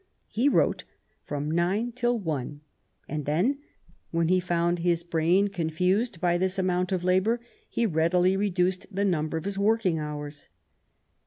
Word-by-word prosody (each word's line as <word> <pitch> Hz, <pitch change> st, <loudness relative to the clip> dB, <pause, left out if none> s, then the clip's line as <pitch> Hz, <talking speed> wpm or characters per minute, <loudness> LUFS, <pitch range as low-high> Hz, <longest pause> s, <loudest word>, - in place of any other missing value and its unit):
He 250 Hz, +6 st, +2 dB
wrote -, -, +2 dB, 0.4 s
from 145 Hz, +1 st, -3 dB
nine 190 Hz, +8 st, 0 dB
till 240 Hz, 0 st, 0 dB
one, 150 Hz, -, -4 dB, 0.5 s
and 150 Hz, -1 st, -4 dB
then, 195 Hz, -, +1 dB, 0.5 s
when 165 Hz, 0 st, 0 dB
he 185 Hz, 0 st, +4 dB
found 175 Hz, -1 st, 0 dB
his 170 Hz, 0 st, +1 dB
brain 170 Hz, +4 st, +2 dB
confused 180 Hz, +4 st, 0 dB
by 175 Hz, 0 st, +1 dB
this 185 Hz, +1 st, 0 dB
amount 180 Hz, -1 st, 0 dB
of 185 Hz, -2 st, -1 dB
labour, 190 Hz, +6 st, +2 dB, 0.3 s
he 235 Hz, -, 0 dB
readily 180 Hz, +1 st, +2 dB
reduced 185 Hz, -2 st, 0 dB
the 200 Hz, 0 st, -1 dB
number 160 Hz, -4 st, 0 dB
of 160 Hz, -, -5 dB
his 200 Hz, 0 st, -3 dB
working 200 Hz, -5 st, +2 dB
hours. 150 Hz, -1 st, -6 dB
180 Hz, 150 wpm, -27 LUFS, 165-200 Hz, 0.5 s, he